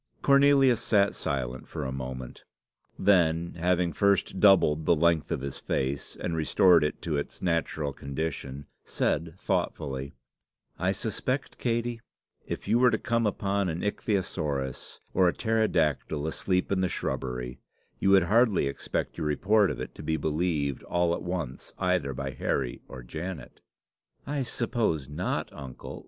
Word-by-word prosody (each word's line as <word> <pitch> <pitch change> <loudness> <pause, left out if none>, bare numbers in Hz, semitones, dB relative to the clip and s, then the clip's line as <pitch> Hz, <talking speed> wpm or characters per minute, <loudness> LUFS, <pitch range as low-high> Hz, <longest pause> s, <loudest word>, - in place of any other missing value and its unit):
Cornelius 140 -3 +5
sat 100 -4 +3
silent 65 -2 -3
for - - -5
a 65 - -3
moment; 65 -1 -6 0.6
then, 85 -3 +3
having 90 -1 +1
first 100 +1 +2
doubled 90 -7 +5
the 85 - +6
length 80 -1 +2
of - - -2
his 70 0 -5
face, 65 +1 -2
and 85 - -2
restored 85 +2 +5
it 75 - -2
to 80 -4 -1
its 70 - -5
natural 80 -4 -1
condition, 70 -1 -4 0.2
said 80 0 -1
thoughtfully, 70 -9 -2 0.6
"I 95 +2 +2
suspect, 115 +7 -3
Katey, 120 -1 -1 0.5
if - - -5
you 115 - +3
were 125 0 +6
to - - +1
come 115 -1 +1
upon 100 -1 0
an 85 +1 -3
ichthyosaurus 80 - -2
or 95 -1 +4
a 85 - +2
pterodactyl 85 - 0
asleep 90 +4 0
in 95 -1 +2
the 95 - +1
shubbery, 60 -6 -3 0.4
you 95 - +2
would 95 -2 +6
hardly 110 - +3
expect 70 +4 -3
your 80 - -1
report 100 +7 +3
of - - -4
it - - -6
to - - -10
be 80 0 -1
believed 75 -2 -1
all 85 -1 +1
at - - -3
once 85 -8 -4
either 90 -8 0
by 70 +1 -3
Harry 65 -1 -2
or 65 -2 -9
Janet." 80 +2 -7 0.6
"I 145 0 -2
suppose 115 - -1
not, 75 - -3
uncle. 65 -2 -8
85 Hz, 150 wpm, -28 LUFS, 70-100 Hz, 0.6 s, the